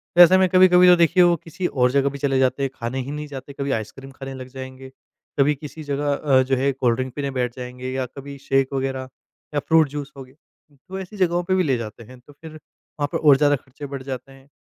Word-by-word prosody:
तो 175 - +8
ऐसे 180 +2 +8
में 190 - +4
कभी-कभी 180 0 +6
तो 180 - +8
देखिए 170 +1 +4
वो 175 0 +4
किसी 175 +2 -3
और 125 -2 +1
जगह 140 +1 +2
भी 140 - -8
चले 135 -1 0
जाते 130 +1 +1
हैं, 135 - 0
खाने 125 +2 -4
ही 135 +2 -5
नहीं 150 0 -5
जाते 140 0 -9
कभी 140 0 -3
आइसक्रीम 135 +5 -5
खाने 135 0 -8
लग 130 -1 -8
जाएँगे, 130 0 -9 0.5
कभी 145 +2 +4
किसी 150 +2 -9
जगह 145 0 -1
अ, 140 -2 +3
जो 135 +1 0
है 135 +2 +1
कोल्ड 125 -3 +1
ड्रिंक 130 -1 -4
पीने 140 -1 -3
बैठ 125 -2 -2
जाएँगे 125 0 -7
या 130 0 -2
कभी 140 0 -8
शेक 135 0 0
वग़ैरह 130 -1 -3 0.5
या - - +3
फ्रूट 160 -2 +5
जूस 145 -1 -6
हो 135 - -7
गया। 130 +1 -19 0.5
तो 190 0 -5
ऐसी 190 +2 -9
जगहों 175 -1 +1
पे 185 +1 0
भी 185 - +2
ले 135 -6 +1
जाते 115 0 -8
हैं 125 +3 -14
तो 145 +4 -18
फ़िर 160 +2 -12
वहाँ 155 -1 -8
पे - - 0
और 145 -3 +5
ज़्यादा 145 0 +3
खर्चे 135 +2 -10
बढ़ 135 -1 -7
जाते 130 0 -7
हैं। 135 0 -18
140 Hz, 250 wpm, -22 LUFS, 130-150 Hz, 0.5 s, तो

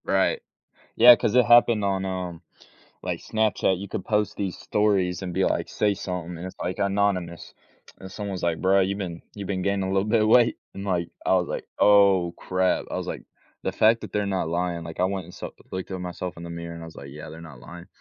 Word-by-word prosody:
Right. 95 -1 +1 0.6
Yeah, 120 +1 +9
'cause 105 - -1
it 125 -1 +6
happened 120 -3 +5
on, 95 -1 0
um, 90 -2 -4 0.6
like - - -3
Snapchat. 110 -4 +1
You 100 +1 -7
could - - -4
post 105 -2 0
these 95 -3 -3
stories 100 -4 0
and 90 -2 -5
be - - +2
like, - - 0
"Say 105 -1 +1
something," 90 -2 -5
and 90 - -6
it's 95 - -9
like 90 +2 -3
anonymous, 100 -4 -1 0.4
and 95 - -10
someone's 100 -2 -5
like 85 -1 0
"Bro, 95 +1 +4
you've 100 +1 -1
been 85 -4 -5
you've 100 -2 -7
been 95 -2 -2
gaining 100 +1 0
a - - -2
little 95 +2 +1
bit 110 0 +3
of 110 - +2
weight," 120 +1 +5 0.2
and, 100 - -6
like, 90 -4 -1 0.2
I - - +4
was 90 -2 +1
like, - - -4
"Oh, 100 -4 +5
crap." 95 0 0
I - - -3
was, - - -4
like, - - -5 0.4
"The - - -2
fact 115 +1 +4
that - - -9
they're 105 -1 0
not 95 -4 -1
lying," 85 0 -2
like, 80 +1 -7
I - - +4
went 95 -1 -2
and 90 - -13
saw - - -7 0.2
looked 95 +1 -5
at 95 -1 -4
myself 90 -1 -5
in 85 - -8
the 85 - -7
mirror 85 0 -6
and 85 - -9
I - - -7
was 80 - -13
like, 70 - -9
"Yeah, 75 +2 -9
they're 80 +2 -10
not 75 -7 -12
lying," 85 +6 -11
95 Hz, 240 wpm, -25 LUFS, 85-100 Hz, 0.6 s, Yeah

